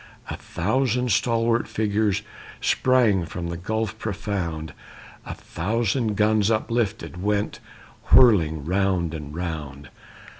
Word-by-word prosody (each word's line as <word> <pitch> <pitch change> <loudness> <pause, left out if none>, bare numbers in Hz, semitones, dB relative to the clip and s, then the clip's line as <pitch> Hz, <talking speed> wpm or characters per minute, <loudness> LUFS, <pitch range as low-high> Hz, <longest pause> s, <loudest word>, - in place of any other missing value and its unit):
A - - -3
thousand 125 +6 -1
stalwart 115 +1 +1
figures 105 -2 0 0.4
Sprang 120 -8 +3
from 85 0 -5
the 85 - -4
gulf 110 +4 -3
profound, 95 -7 -4 0.5
A - - -5
thousand 110 +4 -1
guns 105 0 +3
uplifted 110 -4 -1
Went 105 +1 -1 0.5
whirling 80 - +5
round 90 -2 0
and 75 -2 -7
round. 75 -5 -5
100 Hz, 105 wpm, -24 LUFS, 85-110 Hz, 0.5 s, whirling